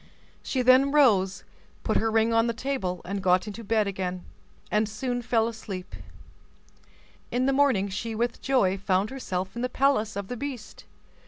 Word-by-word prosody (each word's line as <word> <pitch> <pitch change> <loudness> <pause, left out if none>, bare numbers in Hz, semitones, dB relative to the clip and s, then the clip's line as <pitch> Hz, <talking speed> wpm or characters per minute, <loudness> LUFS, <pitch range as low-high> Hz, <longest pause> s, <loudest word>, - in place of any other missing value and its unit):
She 255 -2 -1
then 260 +2 +5
rose, 205 -10 +3 0.4
put - - +1
her 225 - +1
ring 225 +1 +2
on 225 +1 +3
the 235 - 0
table, 230 -9 -3 0.2
got 185 +1 +3
into 215 +2 -7
bed 220 0 +1
again, 185 -2 -4 0.5
and 210 0 +1
soon 245 +3 -3
fell 225 -1 +1
asleep. 200 -5 -7 1.3
In 250 +1 0
the 275 - +2
morning 265 -8 +3
she 220 +4 -4
with 235 +2 -2
joy 195 -8 +2
found 195 +2 0
herself 190 -7 -4
in 235 - -4
the 250 - -1
palace 250 -7 +1
of 200 -1 -4
the 245 - -5
beast. 255 -4 -7
225 Hz, 165 wpm, -26 LUFS, 195-250 Hz, 1.3 s, then